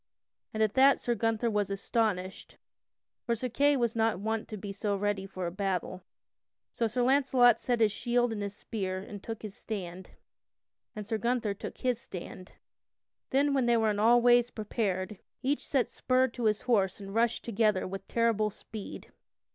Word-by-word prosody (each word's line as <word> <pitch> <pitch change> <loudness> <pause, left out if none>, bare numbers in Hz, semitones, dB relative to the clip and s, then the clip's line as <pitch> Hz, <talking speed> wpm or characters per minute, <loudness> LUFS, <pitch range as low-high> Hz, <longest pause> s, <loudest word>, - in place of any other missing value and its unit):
And 220 0 +1
at 215 - +1
that 270 +1 +5
Sir 240 - 0
Gunther 225 +1 0
was 205 -2 0
astonished, 195 -2 -2 0.7
for 235 - 0
Sir 250 +3 -3
Kay 285 +4 +3
was 235 -2 0
not 225 -4 +1
wont 220 +2 -2
to 215 - -6
be 200 0 -6
so 200 +1 -1
ready 200 -1 -1
for 185 -2 -5
a 170 - -2
battle. 185 -1 -2 0.7
So 230 - 0
Sir 245 +3 -1
Launcelot 255 -3 +4
set 240 -2 0
his 215 -2 +5
shield 240 +1 0
and 205 -2 -3
spear 195 -2 -4
and 200 +1 -8
took 225 +1 -7
his 210 -2 -6
stand, 185 -4 -6 0.9
and 210 -1 -5
Sir 220 +1 -2
Gunther 235 -2 0
took 200 - -8
his 250 -2 0
stand. 185 -5 -9 0.8
Then, 280 +2 +2
when 265 -3 +2
they 235 -1 +4
were 220 -1 +2
in 205 - -2
all 235 +2 +5
ways 240 0 +5
prepared, 205 -4 -3 0.2
each 280 +3 -1
set 270 -3 +1
spur 255 +1 +1
to 235 0 -5
his 215 -1 +2
horse 205 -7 +1
and 195 -1 -8
rushed 230 +1 +1
together 215 -3 +1
with 195 +1 -7
terrible 230 -2 +1
speed. 210 0 -9
220 Hz, 180 wpm, -30 LUFS, 200-240 Hz, 0.9 s, that